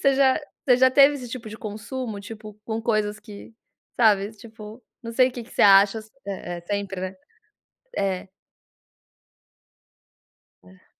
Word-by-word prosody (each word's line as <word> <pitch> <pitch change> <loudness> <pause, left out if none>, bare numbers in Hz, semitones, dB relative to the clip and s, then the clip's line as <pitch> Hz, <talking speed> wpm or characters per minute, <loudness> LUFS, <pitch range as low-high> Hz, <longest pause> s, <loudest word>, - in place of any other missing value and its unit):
Você 275 -1 +4
já 270 +1 +3 0.3
você 250 -3 +6
já 260 0 +6
teve 280 +2 +6
esse 250 -4 -7
tipo 230 -2 -7
de 220 - -9
consumo, 220 +1 -6
tipo, 215 0 -10
com 225 -1 -3
coisas 215 -2 0
que, 210 +1 -12 0.5
sabe, 205 -3 +4
tipo, 220 +1 -12 0.2
não 230 -1 -6
sei 255 +2 +4
o - - -10
que 240 -1 -6
que - - -20
você - - +1
acha 200 +2 +6
s 220 0 -12 0.2
é 180 -3 -5
é - - -9
sempre, 200 +1 -3
né? 185 0 -4 0.8
É. 190 -1 -1 2.4
É. 90 +1 -20
215 Hz, 160 wpm, -24 LUFS, 200-245 Hz, 2.4 s, você